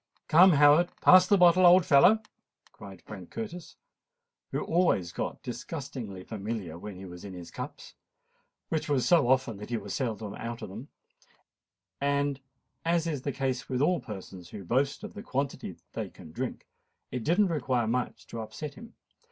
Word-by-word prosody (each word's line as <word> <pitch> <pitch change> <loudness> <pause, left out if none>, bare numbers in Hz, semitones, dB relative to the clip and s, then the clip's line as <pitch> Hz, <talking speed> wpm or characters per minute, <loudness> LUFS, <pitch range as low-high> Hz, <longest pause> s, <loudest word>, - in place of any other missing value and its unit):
"Come, 175 +3 +7
Howard, 150 +4 +6
pass 185 0 +7
the 200 - +5
bottle, 180 0 +6
old 180 0 +7
fellow," 190 +11 +6 0.5
cried 95 -3 -12
Frank 95 -5 -10
Curtis, 180 -6 -7 0.8
who - - -1
always 160 - +1
got - - -4
disgustingly 125 - -6
familiar 100 -5 -5
when 105 +1 -8
he 95 +1 -9
was 90 -1 -10
in 100 -2 -8
his 90 -1 -9
cups—which 160 -1 -8
was 135 -4 +2
so 170 -8 +5
often 130 -4 +2
that 105 +2 -9
he 120 - -1
was 100 -2 -6
seldom 110 -6 -3
out 115 0 -6
of - - -6
them: 110 +8 -9 1.1
and, 140 -1 +1 0.4
as 170 0 +1
is 150 -5 -2
the 140 - -2
case 130 -1 -2
with 130 -1 -1
all 170 +5 +2
persons 95 -4 -9
who 100 - -8
boast 135 - 0
of 215 - -7
the 205 - -8
quantity 140 - -3 0.2
they - - -4
can 80 - -13
drink, - - -5 0.5
it 125 -2 -3
did 170 +7 +2
not 205 -4 +3
require 130 -6 0
much 120 +3 -2
to 115 - -6
upset 110 +7 -7
him. 230 +6 -13
130 Hz, 170 wpm, -29 LUFS, 105-165 Hz, 1.1 s, Come